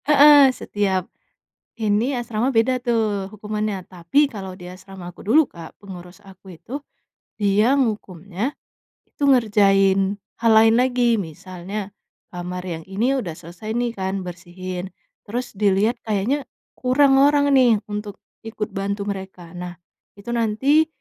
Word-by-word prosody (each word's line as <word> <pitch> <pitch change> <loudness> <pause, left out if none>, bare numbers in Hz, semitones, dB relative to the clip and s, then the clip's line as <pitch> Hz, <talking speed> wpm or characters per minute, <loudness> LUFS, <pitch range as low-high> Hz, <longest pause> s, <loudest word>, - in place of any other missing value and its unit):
Heeh, 290 -1 +8
setiap 200 -7 -1 0.8
ini, 215 +5 +1
asrama 240 +1 -1
beda 245 +3 +3
tuh 215 -4 0
hukumannya. 210 -1 -3
Tapi 185 - +1
kalau 195 -6 -7
di 180 -1 -11
asrama 185 0 -10
aku 180 - -14
dulu, 290 +7 +4
Kak, 165 -2 -12
pengurus 180 -1 -11
aku 190 -1 -14
itu 280 +4 -7 0.6
dia 210 +6 +3
ngehukumnya 205 - -2 0.5
itu - - -12
ngerjain 195 -5 +3 0.3
hal 230 -1 +5
lain 225 +1 +6
lagi. 245 -3 +2
Misalnya 185 +4 -7 0.4
kamar 180 0 -5
yang 165 -3 -5
ini 220 +7 0
udah 175 -8 -5
selesai 175 +8 -8
nih 240 -1 0
kan, 190 -2 -3
bersihin, 180 +1 -7 0.4
terus 245 +4 -4
dilihat 205 +3 +1
kayaknya 225 +7 -1 0.2
kurang 270 +1 +3
orang 285 0 +4
nih 245 -6 +4
untuk 205 -1 -5 0.3
ikut 215 -1 -4
bantu 200 +1 -3
mereka. 190 -4 -7
Nah, 180 0 -7 0.4
itu 200 +3 -9
nanti 240 +7 +2
205 Hz, 130 wpm, -22 LUFS, 190-240 Hz, 0.8 s, Heeh